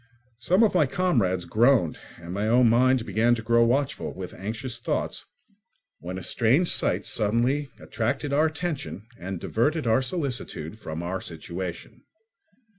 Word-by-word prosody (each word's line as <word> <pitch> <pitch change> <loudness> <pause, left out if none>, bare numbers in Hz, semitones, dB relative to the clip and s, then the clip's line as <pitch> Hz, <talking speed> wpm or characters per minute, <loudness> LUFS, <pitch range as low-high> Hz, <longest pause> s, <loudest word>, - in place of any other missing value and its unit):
Some 180 - +3
of 220 - +3
my 160 -6 +3
comrades 115 - +1
groaned, 110 - +3 0.2
and 85 +1 -8
my 100 +3 -1
own 120 +2 +5
mind 125 +1 +3
began 110 +4 +2
to 115 - -6
grow 115 +1 +4
watchful 130 +4 0
with 90 -1 -7
anxious 115 +5 -5
thoughts, - - -3 0.7
when 90 +2 -6
a 95 - -6
strange 125 - +2
sight - - +2
suddenly 120 +7 +1
attracted 135 +5 -2
our 155 +3 +4
attention 155 - -4
and 95 0 -5
diverted 145 - 0
our 115 +3 +3
solicitude 125 - -3
from 80 -4 -6
our 90 +2 -2
own - - -9
situation. 85 +2 -6
115 Hz, 150 wpm, -26 LUFS, 95-140 Hz, 0.7 s, own